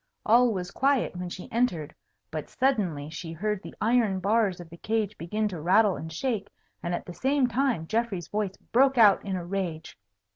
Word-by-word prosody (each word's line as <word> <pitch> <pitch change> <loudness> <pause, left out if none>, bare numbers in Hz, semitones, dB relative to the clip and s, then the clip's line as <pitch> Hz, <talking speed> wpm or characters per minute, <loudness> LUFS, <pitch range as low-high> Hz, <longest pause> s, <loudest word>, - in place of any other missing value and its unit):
All 240 +2 +5
was 180 -4 -4
quiet 275 -7 +1
when 180 0 -4
she 180 - -8
entered; 225 -11 0 0.4
but - - -5
suddenly 195 - 0
she 165 +1 -6
heard 210 +4 -2
the - - -10
iron 220 -4 +2
bars 200 -1 +1
of 175 - -9
the 170 - -10
cage 215 +1 -1
begin 210 +6 -2
to 175 -5 -6
rattle 195 +4 +4
and 160 +1 -7
shake, 220 +3 -2 0.3
and 175 0 -1
at - - -6
the 175 - -8
same 270 +5 +2
time 245 - 0
Geoffrey's 220 -3 -1
voice 205 -2 -2
broke 265 +2 +2
out 210 -4 +6
in 190 -2 -2
rage. 175 -2 -4
205 Hz, 185 wpm, -27 LUFS, 175-230 Hz, 0.4 s, out